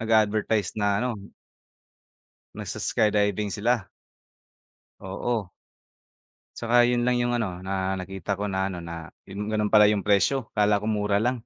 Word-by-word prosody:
nag-a-advertise 110 -2 +1
na 100 -1 +2
ano 125 +5 0 1.5
nag-s-skydiving 105 -1 0
sila. 115 0 0 1.1
Oo. 100 +1 -3 1.1
Tsaka 120 +1 +3
yun 120 -1 +1
lang 125 -1 +2
yung 120 0 +1
ano 95 -6 -3
na 95 0 -2
nakita 95 0 -4
ko 100 +1 -3
na 95 0 0
ano 90 -3 -4
na, 85 -1 -8 0.2
yun 100 +2 -5
gano'n 105 -1 0
pala 105 0 +7
yung 100 - -1
presyo, 105 +6 +2
akala 105 -1 +3
ko 110 - -2
mura 105 -1 +1
lang. 120 0 -1
105 Hz, 135 wpm, -25 LUFS, 95-110 Hz, 1.5 s, pala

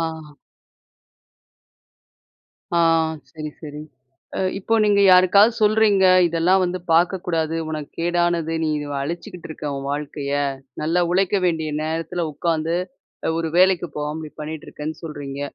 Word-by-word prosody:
ஆ. 160 -3 -5 2.4
ஆ - - +4 0.5
சரி, 155 -2 -6
சரி. 150 -2 -8 0.6
அ - - -1 0.2
இப்போ 215 +4 0
நீங்க 205 -1 +4
யாருக்காவது 200 +5 +6
சொல்றீங்க. 210 -2 +4 0.2
இதெல்லாம் 170 +3 +2
வந்து 180 0 -2
பாக்கக்கூடாது 165 -2 +1
உனக்கு 155 -2 -5
கேடானது 170 -1 0
நீ 155 - 0 0.3
அழிச்சுக்கிட்டு 175 +4 -6
இருக்க 150 -2 -5
உன் 140 0 -5
வாழ்க்கைய. 145 -1 -4 0.5
நல்லா 165 +3 +1
உழைக்க 195 +2 +2
வேண்டிய 160 -3 0
நேரத்தில 165 +2 -2
உக்காந்து, 165 +1 -1 0.5
அ - - +2
ஒரு 165 -1 -2
வேலைக்கு 185 -2 +4
போகாம 150 +2 -3
இப்டி - - -20
பண்ணிட்டு 155 0 -7
இருக்கேன்னு 155 +1 -6
சொல்றீங்க. 145 -3 -6
165 Hz, 125 wpm, -22 LUFS, 155-180 Hz, 2.4 s, யாருக்காவது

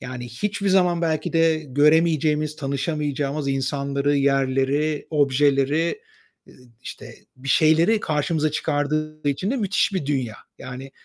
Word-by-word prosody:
yani, 125 -1 -7
hiçbir 200 - -3
zaman 180 -3 +2
belki 160 -1 -1
de 165 -1 +3
göremeyeceğimiz, 150 +1 +2
tanışamayacağımız 145 0 -2
insanları, 140 +1 -1
yerleri, 135 +2 +1
objeleri, 145 - +1 0.8
işte, - - -9 0.2
bir 130 +1 -9
şeyleri 165 +9 +4
karşımıza 155 0 0
çıkardığı 155 0 -2
için 165 +9 -1
de 270 - 0
müthiş 200 -3 0
bir 180 -7 -2
dünya. 130 -7 -2 0.2
Yani, 130 +2 -8
150 Hz, 115 wpm, -22 LUFS, 135-160 Hz, 0.8 s, şeyleri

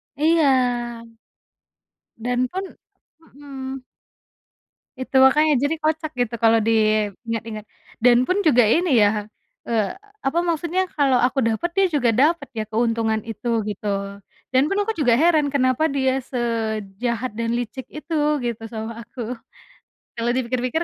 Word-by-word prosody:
Iya. 250 -7 +1 1.1
Dan 245 +2 -1
pun 380 +1 -3 0.7
mhm. 270 -2 -7 1.1
Itu 260 +1 +2
makanya 300 +4 +5
jadi 285 +3 +1
kocak 310 0 -1
gitu 245 -1 -1
kalau 225 0 +5
diingat-ingat, 215 0 0 0.4
dan 245 +1 +5
pun 375 +6 +1
juga 250 - +4
ini 300 +4 +3
ya, 210 0 +2 0.4
eee, 220 -3 0 0.3
apa 280 +5 +1
maksudnya 350 +2 -1
kalau 270 -4 +3
aku 260 0 +1
dapat 230 +10 0
dia 390 - +5
juga 255 -5 +2
dapat 290 +3 +2
ya 215 - -2
keuntungan 225 0 0
itu 230 +1 -2
gitu, 200 -1 -4 0.3
dan 260 +2 +3
pun 395 +6 -1
aku 445 +2 -1
juga 255 -7 +3
heran 300 +1 +3
kenapa 255 +2 +2
dia 265 -1 +1
sejahat 230 -1 -3
dan 230 0 -1
licik 245 +2 -4
itu 315 +1 -4 0.2
gitu 235 -2 -4
sama 225 +1 -6
aku. 240 0 -6 0.7
Kalau 235 +1 -1
dipikir-pikir 255 +4 -1
245 Hz, 130 wpm, -22 LUFS, 225-285 Hz, 1.1 s, makanya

